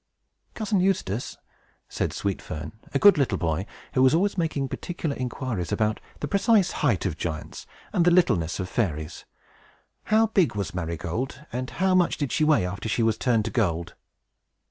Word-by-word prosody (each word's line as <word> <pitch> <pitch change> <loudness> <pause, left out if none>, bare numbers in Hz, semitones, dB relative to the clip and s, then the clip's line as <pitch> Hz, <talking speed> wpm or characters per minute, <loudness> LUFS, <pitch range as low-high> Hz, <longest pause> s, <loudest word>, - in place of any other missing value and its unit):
"Cousin 215 -3 0
Eustace," 170 - -1 0.5
said - - -2
Sweet 100 -2 -2
Fern, 80 +1 -6 0.2
a - - +1
good 200 +2 +7
little 135 - +1
boy, 85 +2 -1 0.3
who 130 - +2
was 130 +3 +5
always 195 +4 +1
making 160 -6 -1
particular 160 0 -4
inquiries 125 - -3
about 110 -1 0 0.2
the - - -1
precise 200 -1 +3
height 120 - +2
of 85 -4 -2
giants 80 -2 -5 0.3
and 175 - +3
the 175 - +5
littleness 100 - +2
of 95 - -2
fairies, 80 -8 -2 0.8
"how 220 +1 +4
big 190 - +2
was 100 -2 -3
Marygold, 90 - -4
and 125 +1 -3
how 190 +1 +1
much 180 -2 +3
did 145 -4 -2
she 155 - +1
weigh 150 -11 +4
after 100 +5 -4
she 115 - +1
was 110 -1 +2
turned 115 -2 +1
to - - -3
gold?" 85 -7 0
125 Hz, 170 wpm, -25 LUFS, -, 0.8 s, good